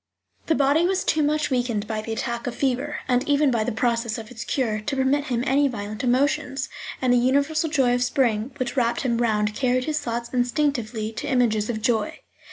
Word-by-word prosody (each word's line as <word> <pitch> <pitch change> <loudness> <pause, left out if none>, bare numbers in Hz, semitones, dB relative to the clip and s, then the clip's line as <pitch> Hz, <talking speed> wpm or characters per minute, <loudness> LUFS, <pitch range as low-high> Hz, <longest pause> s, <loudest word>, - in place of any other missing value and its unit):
The 320 - +3
body 285 +4 +3
was 380 0 0
too 310 - +1
much 300 0 +1
weakened 240 -5 0
by 220 -1 -3
the 225 - -6
attack 235 +2 -3
of 245 - -3
fever, 275 +2 -1
and 250 -1 +2
even 285 -1 +3
by 230 -3 +1
the 245 - -2
process 230 0 0
of 225 +1 -9
its 235 -1 -6
cure, 230 -6 -1
to 245 +6 -3
permit 270 +2 +1
him 245 -4 -1
any 280 +1 +3
violent 215 -3 -5
emotions, 270 +2 +1 0.3
and 255 -1 +2
the - - +5
universal 285 +6 +1
joy 265 -5 +2
of 245 0 +1
spring 245 -3 +1
which 255 -1 -3
wrapped 235 -2 +1
him 235 -3 0
round 210 -3 +1
carried 255 +1 +1
his 305 +2 -1
thoughts 235 -1 -4
instinctively 245 -4 0
to 225 - -6
images 225 -4 +1
of 220 -2 -3
joy. 220 -2 0
245 Hz, 205 wpm, -24 LUFS, 230-280 Hz, 0.3 s, the